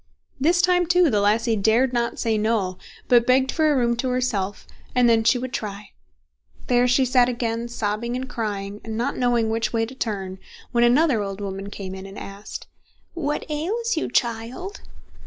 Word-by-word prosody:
This 340 +6 +3
time, 360 -1 +3
too, 355 -3 +4
the 205 -2 +2
lassie 225 +3 +2
dared 225 +5 +2
not 235 -1 -1
say 225 -2 0
No, 210 -4 0 0.3
but 240 -2 +4
begged 260 +1 +3
for 310 -2 +2
a - - +2
room 235 -1 +2
to 255 +2 -1
herself, 220 -6 -1 0.3
and 250 -1 +5
then 225 -1 +4
she 230 +3 +4
would 250 0 -5
try. 205 -1 -5 0.8
There 245 0 +3
she 260 +2 +3
sat 250 -1 +4
again, 235 -1 -2
sobbing 235 +1 -2
and 260 +1 -4
crying, 205 -4 -4
and 220 -1 -5
not 245 +5 -1
knowing 240 -3 +1
which 225 +1 -1
way 225 -1 +1
to 240 - -10
turn, 195 -7 -4 0.3
when 240 -1 +3
another 250 -1 +4
old 195 -1 -4
woman 195 0 -5
came 195 -2 -7
in 190 0 -8
and 195 - -11
asked: 200 +1 -8 0.5
"What 295 -4 -2
ails 395 +10 -1
you, 320 - -2
child?" 240 - -2
235 Hz, 185 wpm, -23 LUFS, 210-255 Hz, 0.8 s, and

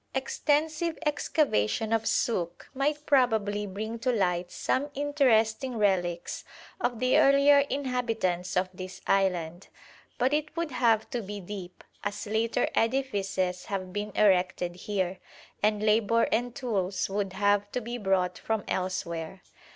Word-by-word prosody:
Extensive 310 +4 0
excavation 225 - +1
at 225 0 +1
Suk 175 -7 -1
might 295 +2 -1
probably 220 -6 +2
bring 220 +4 -5
to 255 +2 +1
light 180 -5 0
some 285 +3 -1
interesting 260 -4 +2
relics 175 -4 0 0.4
of 240 -2 -1
the 255 0 +4
earlier 280 +1 +6
inhabitants 225 -10 -1
of 185 +1 +2
this 185 0 -8
island, 180 -2 0 0.5
but 255 +3 +2
it 305 +2 -1
would 335 -3 -1
have 230 -3 +2
to 245 -3 -2
be 205 0 -6
deep, 185 -1 -8 0.2
as 205 0 -3
later 225 +3 0
edifices 200 -7 0
have 185 -2 -4
been 210 0 -3
erected 185 -3 +2
here; 185 -1 -2 0.4
and 210 0 +2
labour 220 +1 +3
and 240 +2 0
tools 195 -7 -1
would 195 -1 -2
have 205 +1 +1
to - - -1
be 240 +1 -5
brought 185 -3 0
from 220 -2 -1
elsewhere. 180 -1 -3
210 Hz, 135 wpm, -28 LUFS, 185-250 Hz, 0.5 s, earlier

